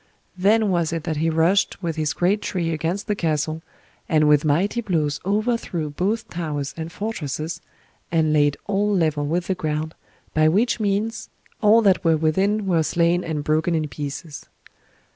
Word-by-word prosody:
Then 205 +3 +3
was 170 -3 +1
it 165 -2 -3
that 160 -2 -2
he 160 +2 +1
rushed 170 +5 +1
with 165 -2 -2
his 155 -1 -1
great 195 +4 +1
tree 170 -3 -2
against 165 +6 -2
the 210 - 0
castle, 155 -3 -1 0.5
and 155 -2 +3
with 150 -1 +4
mighty 175 +10 +1
blows 155 -8 -1
overthrew 205 -7 -1
both 215 +9 -1
towers 150 -6 -4
and 160 0 -6
fortresses, 165 - -4 0.5
and 160 -2 +2
laid 145 -1 +3
all 205 +1 0
level 155 -6 +1
with 170 +3 -1
the 190 - 0
ground, 155 -2 -3 0.4
by 155 0 +4
which 215 +10 +2
means 215 +2 -1 0.3
all 225 +2 +5
that 195 -3 +3
were 165 -2 +3
within 190 +7 +1
were 175 -4 +2
slain 170 +2 +1
and 155 -3 -3
broken 155 +3 +1
in 155 -1 0
pieces. 145 +2 -7
165 Hz, 165 wpm, -22 LUFS, 155-200 Hz, 0.5 s, all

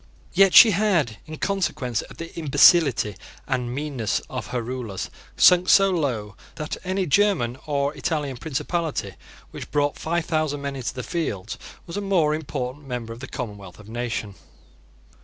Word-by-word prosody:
Yet 195 -1 +5
she 225 - +10
had, 175 - +1
in 155 0 -7
consequence 160 - -1
of - - -13
the 165 0 -8
imbecility 145 - +4 0.3
and 125 -1 -1
meanness 135 -6 -2
of - - -4
her 125 -2 -3
rulers, 120 -5 -5 0.3
sunk 180 0 +6
so 195 -1 +6
low 120 - -2 0.2
that 155 -1 -4
any 190 0 -1
German 155 - +2
or 140 -1 0
Italian 150 -5 -2
principality 155 - -3 0.4
which - - -8
brought 145 0 0
five 170 +1 -1
thousand 155 -3 -1
men 140 -1 -3
into 130 -3 -4
the 125 - -4
field 115 - -3 0.3
was 170 +2 -6
a - - -1
more 180 -7 +2
important 140 -2 -4
member 120 -3 -4
of 115 - -11
the 130 - -7
commonwealth 100 -7 -7
of 105 - -14
nations. 115 -3 -4
145 Hz, 160 wpm, -24 LUFS, 120-170 Hz, 0.4 s, she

